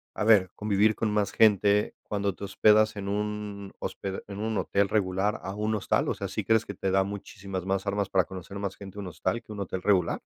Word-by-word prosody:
a - - -1
ver, 105 -5 +5
convivir 105 +1 +2
con 110 -2 -1
más 105 -1 +1
gente 105 -1 +4
cuando 100 -2 -2
te - - -10
hospedas 110 +2 +4
en 100 -1 -4
un 105 -1 -3
hospe 95 -1 -5
en 100 0 -7
un 110 -1 -1
hotel 100 0 +1
regular 100 0 0
a 95 +1 -4
un 105 +1 0
hostal? 105 - +1
O - - +1
sea, - - -4
¿sí - - -3
crees 110 0 +3
que 100 - -6
te 95 +1 -1
da 95 0 +4
muchísimas 95 -2 -6
más 95 +1 -1
armas 100 0 0
para 95 -2 +3
conocer 95 +1 -8
más 100 -2 -3
gente 100 0 -9
un 100 - -5
hostal 95 +5 -2
que - - -13
un 100 - -7
hotel 95 -1 -4
regular? 95 -5 +2
100 Hz, 225 wpm, -28 LUFS, 95-105 Hz, -, ver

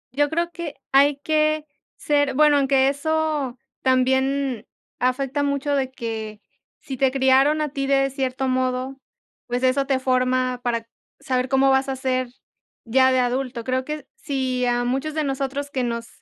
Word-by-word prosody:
Yo 290 +1 +2
creo 340 +2 -1
que 340 -4 -6 0.2
hay 280 +1 +5
que 310 0 +1 0.3
ser 290 -2 +1
bueno, 300 0 +5
aunque 270 -1 +3
eso 295 -2 -1 0.2
también 265 -1 +1 0.3
afecta 265 +3 0
mucho 285 0 0
de 265 -2 0
que 220 -4 -5 0.4
si 265 - -6
te 270 +1 +3
criaron 270 +3 +3
a 300 - -1
ti 275 -1 -3
de 275 0 +3
cierto 265 -1 -2
modo, 255 +1 -1 0.5
pues, 245 +1 -2
eso 260 +1 +2
te 270 -1 +2
forma 255 -1 +1
para 230 -1 -2 0.3
saber 255 -1 -1
cómo 270 0 +4
vas 265 0 +2
a 265 - -1
ser 255 -1 -1 0.6
ya 260 +3 +4
de 255 - +3
adulto. 250 -1 -1
Creo 255 +1 -1
que 300 -1 -5
si 260 -3 -2
a 245 0 +1
muchos 270 +5 -2
de 310 - 0
nosotros, 275 +1 -3
que 260 -3 -1
nos 235 -1 -3
265 Hz, 165 wpm, -23 LUFS, 255-280 Hz, 0.6 s, hay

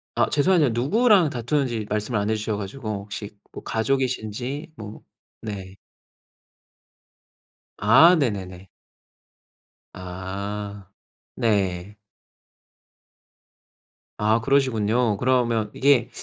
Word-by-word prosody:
아 - - +2
죄송하지만 150 -4 +3
누구랑 185 - +3
다투는지 120 -3 -1
말씀을 105 +1 -1
안 100 +1 -1
해 110 - +1
주셔 110 0 -2
가지고 105 +4 -6
혹시 105 +1 -7 0.2
뭐 - - -10
가족이신지 130 +3 -2
뭐 105 -1 -9 0.4
네. 100 -4 -7 2.0
아. 140 +12 +6
네네네. 95 - -3 1.3
아. 100 +2 -6 0.5
네. 100 -2 -1 2.2
아. 110 +2 +2
그러시군요. 115 -4 +1
그러면 120 -4 +1
이게 130 -3 +3
110 Hz, 185 characters per minute, -23 LUFS, 105-130 Hz, 2.2 s, 아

